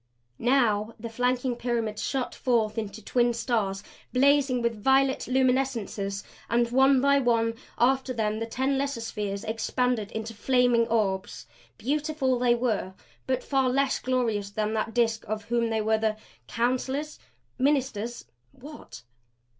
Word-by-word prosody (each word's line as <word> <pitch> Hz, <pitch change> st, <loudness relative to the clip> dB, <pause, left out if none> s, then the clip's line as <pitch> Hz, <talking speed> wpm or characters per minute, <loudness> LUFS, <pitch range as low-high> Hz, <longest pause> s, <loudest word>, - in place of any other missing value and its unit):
Now 230 Hz, -4 st, +2 dB
the 230 Hz, +1 st, -6 dB
flanking 250 Hz, +1 st, 0 dB
pyramids 230 Hz, -3 st, -2 dB
shot 265 Hz, -3 st, -2 dB
forth 225 Hz, -3 st, 0 dB
into 215 Hz, 0 st, -7 dB
twin 240 Hz, -1 st, +2 dB
stars, 205 Hz, -5 st, -1 dB, 0.3 s
blazing 270 Hz, -1 st, +3 dB
with 230 Hz, -3 st, -1 dB
violet 270 Hz, 0 st, +3 dB
luminescences. 250 Hz, -6 st, 0 dB, 0.3 s
And 235 Hz, 0 st, +2 dB
one 265 Hz, +1 st, +5 dB
by 280 Hz, +1 st, +4 dB
one 230 Hz, -3 st, +2 dB, 0.2 s
after 265 Hz, +2 st, +2 dB
them 220 Hz, -3 st, -1 dB
the 225 Hz, -, -3 dB
ten 265 Hz, +3 st, 0 dB
lesser 275 Hz, -4 st, -2 dB
spheres 205 Hz, -3 st, -4 dB
expanded 225 Hz, 0 st, -1 dB
into 220 Hz, +1 st, -5 dB
flaming 245 Hz, 0 st, +2 dB
orbs; 195 Hz, -4 st, -1 dB, 0.3 s
beautiful 285 Hz, -1 st, 0 dB
they 245 Hz, -1 st, +3 dB
were, 220 Hz, -6 st, -1 dB, 0.3 s
but 260 Hz, -1 st, 0 dB
far 270 Hz, -2 st, +1 dB
less 275 Hz, +1 st, +1 dB
glorious 230 Hz, -6 st, -1 dB
than 215 Hz, +1 st, -2 dB
that 225 Hz, +1 st, -2 dB
Disk 225 Hz, -2 st, +1 dB
of 215 Hz, 0 st, -3 dB
whom 235 Hz, -1 st, 0 dB
they 220 Hz, -1 st, 0 dB
were 220 Hz, +1 st, +1 dB
the 215 Hz, -1 st, 0 dB, 0.3 s
counselors? 260 Hz, +5 st, -1 dB, 0.4 s
ministers? 250 Hz, -, 0 dB, 0.3 s
what? 290 Hz, -, -12 dB
240 Hz, 140 wpm, -27 LUFS, 220-260 Hz, 0.4 s, one